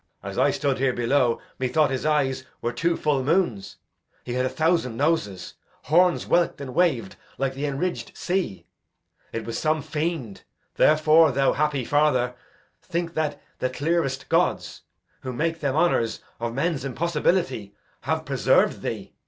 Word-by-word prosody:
Edg. -, -, -5 dB
As -, -, -9 dB
I -, -, +4 dB
stood 140 Hz, -3 st, 0 dB
here 135 Hz, -1 st, +2 dB
below, 120 Hz, 0 st, +2 dB, 0.2 s
methought 140 Hz, +3 st, +2 dB
his 135 Hz, +3 st, -1 dB
eyes 135 Hz, -4 st, +1 dB, 0.2 s
Were 120 Hz, -, -2 dB
two 170 Hz, +7 st, 0 dB
full 145 Hz, -3 st, +1 dB
moons; 140 Hz, -, 0 dB, 0.5 s
he 120 Hz, -, -5 dB
had 125 Hz, +1 st, +1 dB
a -, -, -3 dB
thousand 160 Hz, -8 st, 0 dB
noses, 140 Hz, -, -1 dB, 0.3 s
Horns 175 Hz, +3 st, +3 dB
whelk'd 170 Hz, -3 st, +1 dB
and 135 Hz, -3 st, -6 dB
wav'd 155 Hz, -, +1 dB, 0.2 s
like 135 Hz, -1 st, -1 dB
the 140 Hz, +2 st, -3 dB
enridged 145 Hz, +6 st, -3 dB
sea. 175 Hz, -, -2 dB, 0.7 s
It 115 Hz, -, -4 dB
was 115 Hz, -, -3 dB
some 155 Hz, -1 st, 0 dB
fiend. 155 Hz, -, -3 dB, 0.3 s
Therefore, 155 Hz, 0 st, +5 dB
thou 135 Hz, +1 st, +2 dB
happy 145 Hz, -4 st, 0 dB
father, 135 Hz, -4 st, +2 dB, 0.5 s
Think 170 Hz, -1 st, -3 dB
that 150 Hz, -3 st, -1 dB, 0.2 s
the 130 Hz, -, 0 dB
clearest 135 Hz, -1 st, -1 dB
gods, -, -, 0 dB, 0.4 s
who 130 Hz, -, -5 dB
make 165 Hz, +5 st, -1 dB
them 140 Hz, -2 st, -1 dB
honours 155 Hz, -9 st, +1 dB, 0.2 s
Of 115 Hz, 0 st, -3 dB
men's 150 Hz, -1 st, 0 dB
impossibility, 140 Hz, -, -1 dB, 0.2 s
have -, -, -2 dB
preserv'd -, -, +2 dB
thee. -, -, -5 dB
145 Hz, 155 wpm, -24 LUFS, 125-165 Hz, 0.7 s, Therefore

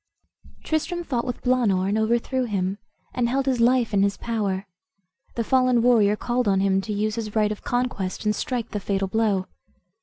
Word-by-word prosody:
Tristram 345 Hz, +3 st, -2 dB
fought 250 Hz, -6 st, -2 dB
with 245 Hz, -2 st, -5 dB
Blaanor, 225 Hz, -7 st, +2 dB
and 200 Hz, -, 0 dB
overthrew 235 Hz, +4 st, 0 dB
him, 195 Hz, -2 st, -2 dB, 0.3 s
and 240 Hz, -1 st, 0 dB
held 270 Hz, +2 st, 0 dB
his 255 Hz, -3 st, +1 dB
life 240 Hz, -2 st, +3 dB
in 200 Hz, -, +3 dB
his 200 Hz, 0 st, +1 dB
power. 205 Hz, -4 st, -2 dB, 0.7 s
The 230 Hz, -, 0 dB
fallen 255 Hz, -1 st, +3 dB
warrior 220 Hz, -4 st, +4 dB
called 240 Hz, +2 st, -1 dB
on 195 Hz, -1 st, +3 dB
him 195 Hz, 0 st, +2 dB
to 215 Hz, -, -6 dB
use 210 Hz, +1 st, -1 dB
his 220 Hz, -2 st, -5 dB
right 210 Hz, -1 st, +2 dB
of 210 Hz, -, -5 dB
conquest, 240 Hz, -7 st, -2 dB
and 210 Hz, 0 st, +2 dB
strike 240 Hz, +1 st, -3 dB
the 210 Hz, -, -2 dB
fatal 195 Hz, 0 st, -1 dB
blow. 205 Hz, -2 st, +1 dB
220 Hz, 185 wpm, -24 LUFS, 200-245 Hz, 0.7 s, warrior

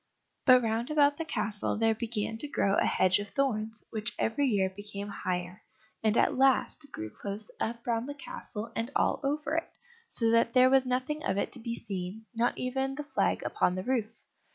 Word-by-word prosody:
But 255 Hz, -2 st, +7 dB
round 225 Hz, +1 st, -1 dB
about 290 Hz, -1 st, +4 dB
the 330 Hz, -, -3 dB
castle 210 Hz, -10 st, 0 dB
there 225 Hz, 0 st, +3 dB
began 225 Hz, -1 st, -3 dB
to 295 Hz, -, -1 dB
grow 200 Hz, -8 st, +1 dB
a -, -, +3 dB
hedge 185 Hz, +1 st, +3 dB
of 205 Hz, 0 st, -5 dB
thorns, 220 Hz, -5 st, -1 dB
which 225 Hz, +1 st, -3 dB
every 270 Hz, +6 st, +1 dB
year 200 Hz, -6 st, +2 dB
became 205 Hz, 0 st, -6 dB
higher, 180 Hz, 0 st, -3 dB, 0.4 s
and 220 Hz, 0 st, +2 dB
at -, -, +3 dB
last 270 Hz, +2 st, +2 dB
grew 110 Hz, 0 st, -6 dB
close 205 Hz, -, -5 dB
up 235 Hz, +1 st, -3 dB
round 235 Hz, +2 st, -1 dB
the 285 Hz, -, -5 dB
castle 230 Hz, -5 st, -7 dB
and 230 Hz, +2 st, -1 dB
all -, -, +2 dB
over 295 Hz, +2 st, -1 dB
it, 330 Hz, -, -4 dB, 0.3 s
so 230 Hz, -1 st, +1 dB
that 230 Hz, 0 st, +3 dB
there 255 Hz, 0 st, +6 dB
was 265 Hz, -1 st, +4 dB
nothing 260 Hz, +5 st, -1 dB
of -, -, 0 dB
it -, -, -1 dB
to 255 Hz, -, -2 dB
be 235 Hz, 0 st, -4 dB
seen, 200 Hz, 0 st, -5 dB
not 235 Hz, +1 st, +1 dB
even 265 Hz, +2 st, -1 dB
the 295 Hz, -, -4 dB
flag 295 Hz, -, 0 dB
upon 180 Hz, -, +1 dB
the 185 Hz, -, -3 dB
roof. 235 Hz, -2 st, 0 dB
230 Hz, 200 wpm, -30 LUFS, 210-265 Hz, 0.4 s, But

